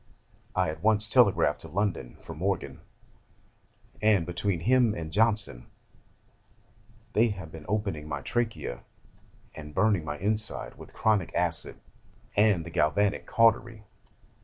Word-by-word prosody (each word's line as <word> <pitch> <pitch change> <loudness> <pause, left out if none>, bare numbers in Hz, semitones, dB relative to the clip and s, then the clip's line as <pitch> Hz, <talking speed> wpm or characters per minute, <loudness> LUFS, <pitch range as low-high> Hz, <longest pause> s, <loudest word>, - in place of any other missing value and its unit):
I 90 -4 +1
at 80 0 -10
once 105 +1 +3
telegraphed 100 - +3
to - - -9
London 85 - -2
for - - -9
Morgan, 90 +3 -2 1.2
and, 105 -5 +3
between 90 +1 0
him 120 +2 +3
and 80 -2 -6
Johnson, 105 - +1 1.5
they 115 +3 +4
have 95 -7 -6
been 80 -1 -11
opening 100 -8 -2
my 70 -2 -4
trachea, 115 - -2 0.7
and 75 -1 -10
burning 105 -6 +2
my 75 -1 -4
inside 105 +4 -1
with - - -13
chromic 105 -6 0
acid - - -1 0.6
and 100 -6 +3
the 85 - -8
galvanic 90 +5 +1
cautery. 115 -1 +2
100 Hz, 125 wpm, -28 LUFS, 80-110 Hz, 1.5 s, they